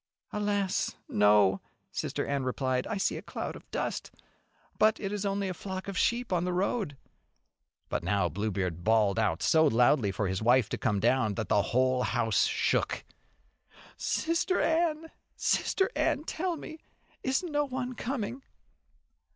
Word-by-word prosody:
"Alas, 205 -2 0
No!" 105 -2 +4 0.3
Sister - - -2
Anne 140 -1 -1
replied. 130 0 -1
"I 215 - -2
see 195 - 0
a - - -6
cloud - - -5
of - - -13
dust, - - -3 0.7
but 215 0 +4
it 195 -2 -3
is 205 -1 -2
only 200 0 -1
a 185 - -2
flock 190 +2 -6
of 195 - -4
sheep 235 +1 +1
on 175 -1 +1
the 180 0 -1
road." 185 - -1 0.9
But - - -2
now 90 +1 +1
Bluebeard 90 -1 -2
bawled 110 -1 +3
out 100 -7 0
so 160 -1 +5
loudly 120 -3 +3
for 100 +1 -1
his 95 +1 -2
wife 120 0 +4
to - - -2
come 105 -4 +1
down, 115 -2 +2
that 110 -2 -3
the 105 - +4
whole 130 +3 +1
house 115 -3 +2
shook. - - 0 0.9
"Sister 335 +3 0
Anne, 325 -1 +1 0.2
Sister 385 +5 +1
Anne, 285 - +1
tell 345 +1 -2
me 315 +1 -9 0.4
is 265 +5 0
no 295 -4 0
one 255 -2 -4
coming?" 250 0 -4
160 Hz, 155 wpm, -29 LUFS, -, 0.9 s, so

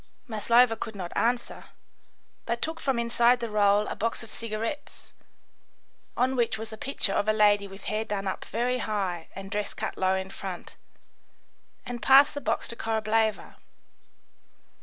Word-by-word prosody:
Maslova 230 +1 +4
could 220 -1 -6
not 180 -3 -6
answer, 240 +1 -1 0.8
but 235 0 -1
took 320 +4 -3
from 270 -5 0
inside 235 +1 +3
the 235 -2 -4
roll 205 0 +4
a - - -4
box 230 +2 -2
of 225 - -12
cigarettes, 230 +6 -5 1.0
on 255 +2 +2
which 230 -3 +1
was 220 0 -7
a - - -5
picture 220 -4 -1
of 205 - 0
a - - +5
lady 205 -1 +4
with 195 0 -11
hair 215 +1 -1
done 200 -2 -3
up 190 - -3
very 250 +3 -1
high 190 -6 -2
and 195 0 -8
dress 210 -1 -2
cut - - -3
low 190 0 +3
in 190 0 -4
front, 190 -3 -7 1.1
and 240 -1 -5
passed 275 +6 +7
the 290 - -5
box - - -1
to 235 - -6
Korableva. 220 -1 0
220 Hz, 160 wpm, -27 LUFS, 205-235 Hz, 1.1 s, passed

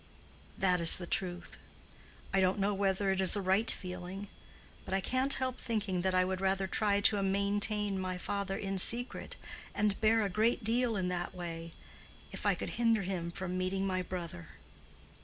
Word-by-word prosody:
That 180 -2 +1
is 165 - +9
the 175 - -6
truth. 175 0 -4 0.7
I 195 - +3
don't 185 +1 +2
know 200 +1 0
whether 195 0 0
it 190 0 0
is 190 - +9
a - - -1
right 190 +5 +2
feeling. 180 +2 -6 0.5
But 190 - -3
I - - +1
can't 260 +7 +2
help 260 -1 -2
thinking 210 -6 -2
that 190 0 0
I 185 0 +3
would 185 0 -3
rather 190 0 0
try 200 +1 0
to 205 0 +3
maintain 200 +1 +2
my 185 -1 -3
father 200 +1 -3
in 195 -1 -3
secret, 240 +6 0 0.4
and 205 0 0
bear 220 0 +3
a - - +1
great 220 +5 +1
deal 230 +1 +1
in 180 -1 -1
that 180 +1 -4
way, 165 -2 -6 0.6
if - - -5
I - - +3
could - - -5
hinder 225 -3 +2
him 180 -3 -3
from 185 0 -4
meeting 190 +1 -1
my 185 -1 -1
brother." 175 -2 -7
195 Hz, 180 wpm, -32 LUFS, 185-205 Hz, 0.7 s, is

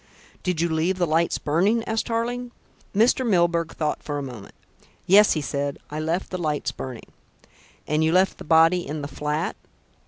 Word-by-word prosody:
"Did 180 -3 -1
you 170 - +2
leave 165 +3 0
the 180 - +2
lights 165 +1 +1
burning?" 195 +10 +1
asked 225 0 -2
Tarling. 240 +1 -2 0.4
Mr. 230 +5 +3
Milburgh 170 -6 +2
thought 155 -2 -2
for 145 -1 -4
a 145 - -3
moment. 120 -7 -9 0.5
"Yes," 205 +3 +6
he 155 - -1
said, 140 0 -3
"I 150 - -4
left 165 +4 -2
the 185 - -3
lights 150 -3 -1
burning." 130 -3 -8 0.7
"And 150 +1 +1
you 160 - +2
left 185 +2 +2
the - - -7
body 165 +2 +4
in 150 0 -4
the - - -3
flat?" 150 +3 -2
165 Hz, 180 wpm, -24 LUFS, 150-190 Hz, 0.7 s, Yes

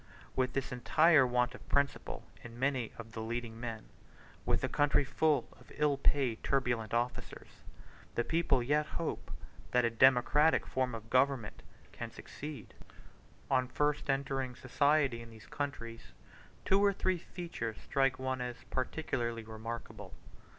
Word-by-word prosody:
With 130 -1 +1
this 135 0 -2
entire 140 +3 +5
want 125 0 +1
of - - -13
principle 140 0 0 0.2
in 120 -1 -10
many 130 -3 0
of 115 -1 -9
the 110 - -5
leading 115 0 -4
men, 115 -2 -5 0.6
with - - +2
the - - +1
country 145 0 +3
full 145 +2 +1
of - - -18
ill 150 -1 +2
paid 135 -4 +1
turbulent 120 -5 0
officers, 120 +2 -3 0.5
the 120 - +2
people 145 -4 +2
yet 150 +4 +2
hope 165 - -3 0.4
that 125 -1 +3
a 115 - +1
democratic 130 +6 +5
form 130 -2 -1
of 110 0 -10
government 130 -4 +2 0.3
can - - -6
succeed! 150 0 -9 0.8
On 130 -1 +3
first 145 +3 0
entering 135 -2 -1
society 135 -1 +2
in 115 - -10
these 110 0 -14
countries, 115 -5 -5 0.5
two 195 +1 +4
or 200 -1 +5
three 185 -2 0
features 165 - -5
strike 135 -1 +2
one 130 -1 -2
as 125 -1 -5
particularly 120 -4 -2
remarkable. 110 +1 -7
130 Hz, 145 wpm, -33 LUFS, 115-145 Hz, 0.8 s, entire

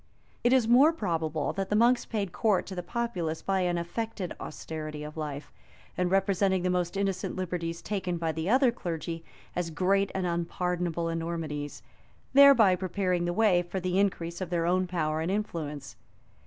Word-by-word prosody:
It 240 - +4
is 255 -4 +4
more 260 +7 +7
probable 160 - -2
that 195 -1 -3
the 210 - +1
monks 240 +3 +4
paid 205 -5 -2
court 210 0 +1
to 195 - -7
the 180 - -3
populace 175 -5 -3
by 195 -1 +1
an 175 -1 +1
affected 190 +2 -4
austerity 155 -1 -6
of 150 0 -8
life; 150 -2 -5 0.4
and 180 0 0
representing 195 -1 +2
the 180 - +1
most 180 +1 -1
innocent 195 -2 -1
liberties 170 -2 -3
taken 185 -4 -2
by 165 -1 -1
the 160 +3 -3
other 255 +1 +5
clergy 165 -6 -5 0.3
as 175 -1 -1
great 195 +5 +1
and 190 -1 -1
unpardonable 170 0 -1
enormities, 165 -3 -4 0.5
thereby 265 -9 +7
prepared 180 -1 -1
the - - +1
way 185 -2 +3
for 175 +2 -4
the 185 +1 0
increase 175 -3 -1
of 185 - -3
their 170 -1 0
own 185 +1 +2
power 155 -3 -1
and 165 - -1
influence. 165 -8 -3
180 Hz, 170 wpm, -28 LUFS, 165-195 Hz, 0.5 s, more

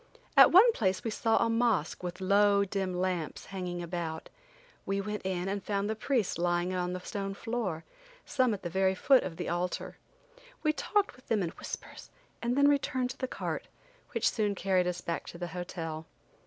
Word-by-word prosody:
At - - +9
one 415 +7 +8
place 190 - 0
we 225 - -2
saw 225 +1 +2
a 230 - +3
mosque 230 -7 +1
with 180 0 -5
low, 200 +1 +4
dim 190 -1 -2
lamps 180 -3 -2
hanging 180 -2 -4
about. 165 -2 -4 0.5
We 195 0 -1
went 210 +1 -3
in 185 -1 -2
and 200 0 -2
found 200 -1 -1
the 220 - -1
priests 220 - 0
lying 175 +1 +1
about 180 - 0
on 180 - -3
the 180 - -3
stone 195 +1 -4
floor, 215 -8 -3 0.4
some 255 -3 +2
at 200 - -12
the 175 - -3
very 190 +1 +2
foot 260 +6 +5
of 165 -3 -5
the 175 - -4
altar. 175 +1 -2 0.7
We 310 -1 +3
talked 410 +5 0
with 255 - -21
them 215 -4 +1
in 170 - -1
whispers - - -8 0.3
and 240 +2 0
then 280 0 +6
returned 260 -3 +1
to 265 - -10
the 260 - -1
cart, - - -4 0.5
which - - +2
soon 210 -2 +1
carried 185 -1 +2
us 180 0 -2
back 170 - -3
to - - -8
the 175 0 -4
hotel. 165 -2 -5
195 Hz, 195 wpm, -30 LUFS, 180-225 Hz, 0.7 s, At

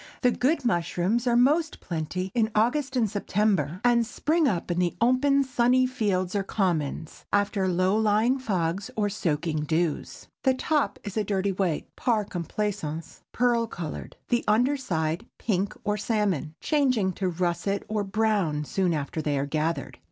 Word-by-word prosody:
The 250 - +5
good 275 +3 +1
mushrooms 190 +3 0
are 240 - +3
most 300 +6 +3
plenty 180 +3 -4
in 225 -3 +2
August 260 +5 +1
and 235 -3 +3
September, 195 -5 0
and 240 -1 +4
spring 305 +7 +1
up 180 -6 -1
in 175 - 0
the 175 -1 +1
open, 275 +3 +3
sunny 255 0 +3
fields 195 -8 -1
or 200 - +2
commons, 165 -6 -2
after 200 -1 +1
low 185 +2 +2
lying 220 +4 +2
fogs 190 -3 -1
or 210 -2 +1
soaking 160 -5 -1
dews. 160 +1 -1 0.2
The 265 -1 +3
top 295 +2 0
is 205 0 -6
a 215 - +2
dirty 195 -1 0
white,—par 195 +5 -1
complaisance, 175 -3 -4
pearl 235 -1 +2
color,—the 215 +6 -4
under 245 +7 +3
side 165 - -2
pink 200 -2 -1
or 210 0 0
salmon, 200 - -1
changing 255 - +1
to 185 +1 -1
russet 180 +3 -1
or 215 -1 -1
brown 195 -7 0
soon 180 +1 0
after 150 +2 -3
they 145 -2 0
are 135 - 0
gathered. 155 +3 -2
205 Hz, 150 wpm, -26 LUFS, 175-240 Hz, 0.2 s, The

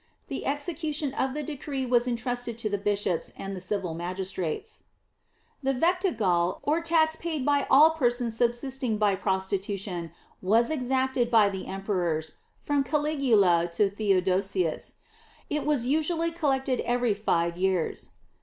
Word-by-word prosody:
The - - -4
execution 295 0 -2
of 265 0 -1
the 300 - -3
decree 280 -2 -4
was 245 0 +2
intrusted 245 -1 -2
to 225 -2 -2
the 205 - -1
bishops 200 -4 -1
and 195 0 -5
the - - -6
civil 185 -2 -2
magistrates. 185 - -4 0.8
The 270 -1 0
vectigal 230 - +1
or 310 +3 +1
tax 320 -1 +3
paid 320 -5 -3
by 285 -1 +2
all 310 +4 +7
persons 245 -6 0
subsisting 240 0 0
by 210 -1 +3
prostitution 190 -2 -2 0.3
was 225 +8 +3
exacted 260 -3 0
by 220 -4 +5
the 190 -1 -6
emperors, 180 -5 -2 0.3
from 285 -1 +1
Caligula 250 - +2
to 200 +2 +2
Theodosius. 190 -3 0 0.6
It 300 0 -1
was 285 -6 +1
usually 320 +4 +1
collected 270 -5 0
every 245 -2 +1
five 170 -5 0
years. 185 -2 -1
240 Hz, 135 wpm, -27 LUFS, 190-285 Hz, 0.8 s, all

